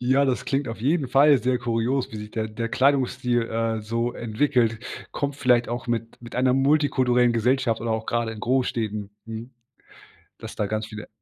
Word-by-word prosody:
Ja, 130 +3 +3
das 130 -2 0
klingt 135 0 -1
auf 115 -1 -6
jeden 140 +2 +1
Fall 140 +1 +6
sehr 125 +1 0
kurios, 120 +2 -1
wie - - -5
sich 105 0 -7
der 110 -1 -3
der 115 +2 -4
Kleidungsstil, 130 -2 +2
äh, 115 0 -1
so 115 +3 -2
entwickelt. 115 -1 0 0.3
Kommt 140 -1 -2
vielleicht 125 -4 +3
auch 120 +1 -4
mit 115 -1 -3
mit 120 0 -11
einer 130 0 +3
multikulturellen 130 -3 +3
Gesellschaft 120 0 +1
oder 115 - -2
auch 110 0 -3
gerade 115 -1 -1
in 110 - -9
Großstädten. 110 -5 -1
Mhm. 115 +2 -7 0.9
Dass - - -9
da 105 - 0
ganz 110 +1 -2
viele 105 0 -9
120 Hz, 180 wpm, -24 LUFS, 115-130 Hz, 0.9 s, Fall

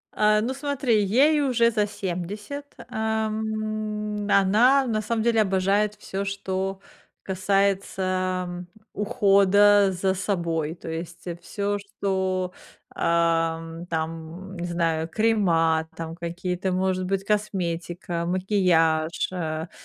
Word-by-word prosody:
А, 210 0 +4
ну 250 +4 -1
смотри, 270 -6 +1
ей 280 +9 +4
уже 235 -4 +3
за 210 -2 +1
70, 205 +9 -5 0.2
ам, 215 -1 -2
она 225 +8 +5
на 220 -3 0
самом 220 +1 -1
деле 230 -1 +3
обожает 200 +1 +1
всё, 195 -1 -5
что 195 -1 -3 0.4
касается, 190 -1 0
м, 175 0 -7 0.3
ухода 205 -2 +4
за 190 +1 0
собой, 170 -5 -2
то 165 - -9
есть, 165 +1 -6
э, 175 -1 -5
всё, 205 +3 -2
что, 190 -2 -2 0.4
ам, 165 0 0
там, 165 +3 -5
не 175 - -3
знаю, 165 -2 0
крема 165 -6 +2
там 165 0 -6
какие-то, 180 +2 -3
может 185 0 0
быть, 195 +1 -1
косметика, 175 -4 -2
макияж, 175 -4 +2
а. 160 -2 -3
190 Hz, 110 wpm, -25 LUFS, 170-210 Hz, 0.4 s, она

